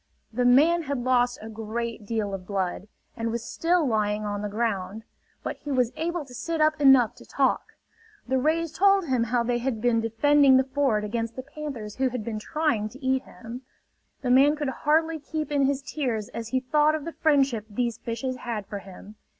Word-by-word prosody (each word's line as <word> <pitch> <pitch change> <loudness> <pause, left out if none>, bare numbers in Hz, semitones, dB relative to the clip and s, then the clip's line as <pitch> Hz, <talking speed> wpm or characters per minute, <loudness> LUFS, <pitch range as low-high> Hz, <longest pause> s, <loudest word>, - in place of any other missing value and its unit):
The 245 +2 +1
man 305 +8 +5
had 280 -5 -3
lost 245 -1 +2
a - - -7
great 225 0 -5
deal 215 -3 -2
of 185 -2 -6
blood, 190 -1 -2 0.3
and 230 -1 -2
was 230 0 -3
still 340 -1 +1
lying 215 -2 0
on 205 0 -3
the 210 - -3
ground; 210 -1 -2 0.4
but - - -4
he 295 - -9
was 250 -4 +2
able 340 -1 -2
to 255 - -14
sit 330 +6 -3
up 310 0 +2
enough 265 -5 +6
to - - -13
talk. - - 0 0.5
The 260 +1 +1
rays 320 +3 +1
told 395 -1 +4
him 255 -5 +1
how 240 +1 +1
they 240 0 0
had 240 -2 -2
been 230 0 +2
defending 265 +4 +4
the 260 - +4
ford 265 -5 0
against 230 +2 -3
the 260 - -6
panthers 275 -7 -7
who 260 0 +2
had 245 -3 -4
been 220 -2 -3
trying 235 -4 -1
to 265 +4 -12
eat 260 0 +2
him. 230 +7 -9 0.6
The 250 - +1
man 275 +4 +6
could 295 -2 -2
hardly 315 +4 +1
keep 305 +1 -4
in 280 -2 +3
his 275 0 -1
tears 250 -8 -3
as 230 -1 -6
he 260 +3 0
thought 300 +4 +3
of 305 - -5
the 335 - -5
friendship 270 -8 +2
these 235 +1 -2
fishes 245 +3 -4
had 230 -5 -4
for 205 - -6
him. 195 +2 -13
250 Hz, 205 wpm, -26 LUFS, 220-290 Hz, 0.6 s, enough